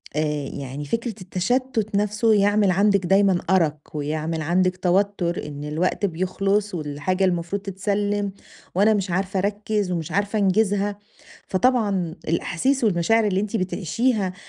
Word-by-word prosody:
آآ 150 -2 -1
يعني 140 +2 -6
فكرة 230 - -2
التشتت 215 +4 -1
نفسه 210 +2 +2
يعمل 205 -1 +3
عندِك 200 0 +3
دايمًا 195 -1 +4
أرق 165 -5 +3 0.2
ويعمل 155 +2 -2
عندِك 185 +3 +1
توتر 180 -2 0
إن 145 0 -7
الوقت 165 +7 -1
بيخلُص 195 +3 -1
والحاجة 155 +5 -1
المفروض 175 +2 -1
تتسلم 205 +1 -1 0.4
وأنا 210 +3 +4
مش 195 -3 -1
عارفة 190 +1 -1
أركز 205 -1 -1
ومش 165 -3 -3
عارفة 205 +2 0
أنجزها، 200 +1 +1 0.5
فطبعًا 195 -6 +1
الأحاسيس 235 - 0
والمشاعر 210 +3 +3
اللي 190 -1 +1
أنتِ 210 +2 -3
بتعيشيها 195 +2 0
195 Hz, 130 wpm, -23 LUFS, 175-205 Hz, 0.5 s, دايمًا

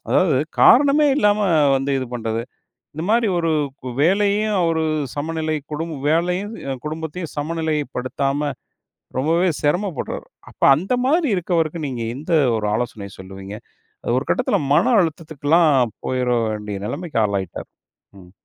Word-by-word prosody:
அதாவது 160 -8 +3 0.2
காரணமே 285 +3 +6
இல்லாம 210 -5 +3 0.4
வந்து 135 +1 -2
இது 130 - -3
பண்ணுறது. 115 -1 -2 0.5
இந்த 160 - -5
மாரி 230 +1 +3
ஒரு 165 -1 0 0.2
இப்ப 130 -1 -9
வேலையையும், 205 +4 +2
அவரு 165 -1 +1 0.3
சமநிலை 155 +1 -2 0.2
குடும்ப 160 +1 -3
வேலையும், 180 +6 0 0.2
அ - - -1
குடும்பத்தையும் 160 +2 -5
சமநிலைப்படுத்தாம 145 -2 -2 0.7
ரொம்பவே 165 +6 +2
சிரமப்படுறார். 175 +1 -1 0.3
அப்ப - - -8
அந்த 185 - -2
மாரி 315 +3 +2
இருக்கவருக்கு 170 -2 -1
நீங்க 125 -3 -4
எந்த 155 +6 -7 0.3
ஒரு 105 -1 -2
ஆலோசனையை 110 -4 -3
சொல்லுவீங்க. 95 +2 -9 0.5
அது 120 - 0
ஒரு 130 - -4
கட்டத்தில, - - +1 0.2
மன 245 +7 +4
அழுத்தத்துக்கல்லாம் 155 -5 +1
போயிட 125 -1 0 0.2
வேண்டிய 105 -2 -4
நெலைமைக்கு 145 0 -3
ஆளாயிட்டாரு. 100 -3 -4 0.5
ம். 90 -1 -16
155 Hz, 125 wpm, -21 LUFS, 130-175 Hz, 0.7 s, காரணமே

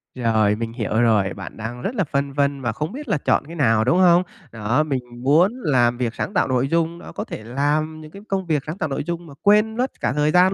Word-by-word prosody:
Rồi, 110 -4 +2
mình 115 +1 -4
hiểu 110 -1 0
rồi, 105 -5 +2
bạn 95 -3 -9
đang 120 +3 -6
rất 235 - -3
là 195 - +1
phân 140 -2 -2
vân 140 -1 0
và 120 -3 -1
không 150 +7 -4
biết 290 +3 -8
là 205 - +1
chọn 140 - +1
cái 170 - -9
nào, 115 -7 +3
đúng 165 +9 +2
không? 175 -1 +6 0.3
Đó, 115 +7 0
mình 135 -4 -1 0.2
muốn 165 +9 +4
làm 120 -5 +2
việc 120 -2 -2
sáng 200 - -3
tạo - - +2
nội 130 0 +1
dung, 165 +2 0
đó, - - -10
có - - -5
thể 110 - -8
làm 150 +6 -1
những 155 0 -12
cái 200 - -11
công 190 -2 -1
việc 150 -4 0
sáng 160 +5 -4
tạo 155 - -2
nội 135 - -2
dung 170 0 -5
mà 140 - -11
quên 210 +2 +3
mất 255 +1 0
cả - - 0
thời 150 +1 +2
gian 185 +2 +5
145 Hz, 260 wpm, -22 LUFS, 120-170 Hz, 0.3 s, không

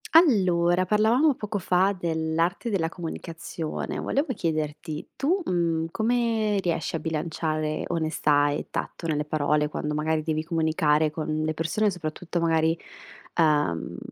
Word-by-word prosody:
Allora 185 - +5
parlavamo 225 - +4
poco 210 -3 -4
fa 185 +1 +2
dell'arte 165 +5 -1
della 180 -6 +1
comunicazione, 165 -1 -5
volevo 280 +3 0
chiederti 155 -3 -3
tu, 330 +9 +1
mhmm, 165 - 0
come 225 -1 +1
riesci 170 -2 -1
a - - -1
bilanciare 155 -1 -2
onestà 150 -3 +2
e 145 - -3
tatto 165 - -4
nelle 150 -2 0
parole, 150 0 +1
quando 150 0 -3
magari 155 +1 0
devi 155 0 -1
comunicare 160 -2 +2
con 155 0 -3
le 155 0 -1
persone 165 +7 +1
soprattutto 175 -1 -4
magari, 165 0 +2 0.6
uhm, 150 - +2
165 Hz, 125 wpm, -26 LUFS, 155-185 Hz, 0.6 s, Allora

